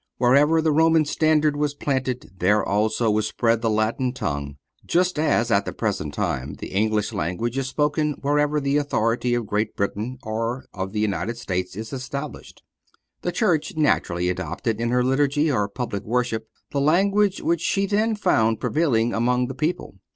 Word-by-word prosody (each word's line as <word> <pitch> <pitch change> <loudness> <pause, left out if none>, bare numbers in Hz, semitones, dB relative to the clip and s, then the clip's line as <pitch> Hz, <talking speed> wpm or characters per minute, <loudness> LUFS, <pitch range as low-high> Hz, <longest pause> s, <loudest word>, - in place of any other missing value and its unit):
Wherever 145 +6 +4
the 160 - +3
Roman 160 +1 +4
standard 155 0 +2
was 145 0 -1
planted, 130 -3 -2
there 105 +4 +3
also 110 +3 +1
was 105 0 +1
spread 115 -1 +1
the 115 - +1
Latin 110 +4 0
tongue; 70 - -4 0.3
just 180 -2 +1
as 120 -6 +2
at 100 -1 +3
the - - -3
present 100 -9 -2
time 70 +3 -2
the - - -8
English 105 +2 0
language 95 +6 -2
is 135 -1 -1
spoken 150 +2 0
wherever 145 +1 +1
the 140 0 +1
authority 120 -3 0
of 120 -2 -2
Great 105 +1 -1
Britain 105 +5 -2
or 115 +3 -3
of 95 0 -4
the 105 - -3
United 110 +2 -1
States 90 -6 -3
is 110 +4 -7
established. 140 +3 -6 0.6
The 175 - -1
Church 175 -8 0
naturally 90 - +1
adopted 90 - -3
in 120 - 0
her 125 +1 +2
Liturgy, 145 +3 +2
or 105 -6 0
public 105 -3 -4
worship, 115 -1 -1 0.2
the 140 -2 0
language 195 +6 +3
which 170 -1 +1
she 195 +3 +1
then 215 +3 +1
found 115 - +2
prevailing 120 -8 +1
among 125 +2 +1
the - - -4
people. 155 - -3
125 Hz, 170 wpm, -23 LUFS, 110-150 Hz, 0.6 s, Wherever